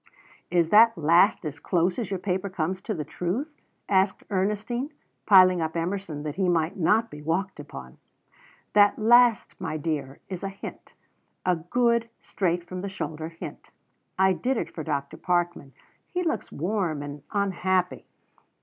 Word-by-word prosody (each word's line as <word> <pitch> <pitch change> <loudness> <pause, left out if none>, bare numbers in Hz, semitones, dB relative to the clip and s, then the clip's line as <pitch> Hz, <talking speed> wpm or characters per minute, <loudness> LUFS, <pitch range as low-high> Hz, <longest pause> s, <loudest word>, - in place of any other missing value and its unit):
'" - - -26
"Is 170 -2 +2
that 225 +2 +6
last 170 +4 +4
as 150 -1 -5
close 175 +3 +1
as 225 - -3
your 195 - -1
paper 190 +1 -2
comes 185 +1 -2
to 215 - -3
the 155 - -3
truth?" 205 - -3 0.3
asked 190 0 +2
Ernestine, 210 +8 -1 0.4
piling 185 -3 +7
up 160 +1 -2
Emerson 170 -3 -3
that 150 +1 -5
he 190 -2 +2
might 165 -1 +1
not 215 +6 +2
be 150 - -9
walked 175 +5 -2
upon. 65 - -10 0.7
"That 205 -1 +5
last, 240 0 +4
my 155 - -2
dear, 145 -3 -3
is 185 -3 -6
a 195 - -3
hint 195 - -10 0.5
a 180 -1 +3
good, 235 +7 +1
straight 175 -2 -1
from 185 0 -5
the 200 - -4
shoulder 160 -4 -5
hint. 165 - -9 0.5
I 190 0 +4
did 250 +7 -1
it - - -4
for 160 - -5
Dr. 140 -2 -3
Parkman. 175 -5 -1 0.4
He 360 0 -2
looks 325 - -2
warm 170 -3 -1
and 145 0 -7
unhappy." 185 -2 0
185 Hz, 160 wpm, -26 LUFS, 160-205 Hz, 0.7 s, piling